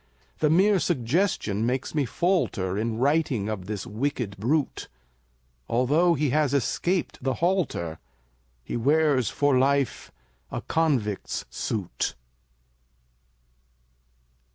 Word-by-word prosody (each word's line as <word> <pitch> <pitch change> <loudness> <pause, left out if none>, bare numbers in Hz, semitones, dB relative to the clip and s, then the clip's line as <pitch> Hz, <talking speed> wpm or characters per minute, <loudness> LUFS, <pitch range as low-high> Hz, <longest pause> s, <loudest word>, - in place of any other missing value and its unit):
The 150 - +3
mere 190 +5 +4
suggestion 135 - 0
makes 125 +3 -1
me 150 -3 +1
falter 120 - 0
In 110 +2 -1
writing 135 -5 +1
of 95 -4 -4
this 105 -2 -4
wicked 115 -2 -2
brute; 135 +8 -1 0.8
Although 150 +9 +3
he 145 -2 0
has 145 -1 +2
escaped 140 +6 -1
the 130 -1 0
halter, 165 - -1 0.6
He - - -5
wears 140 +1 +2
for 145 -3 +2
life 140 -1 +1 0.4
a - - -4
convict's 130 -11 -1
suit. 100 -6 -3
135 Hz, 105 wpm, -26 LUFS, 115-160 Hz, 0.8 s, mere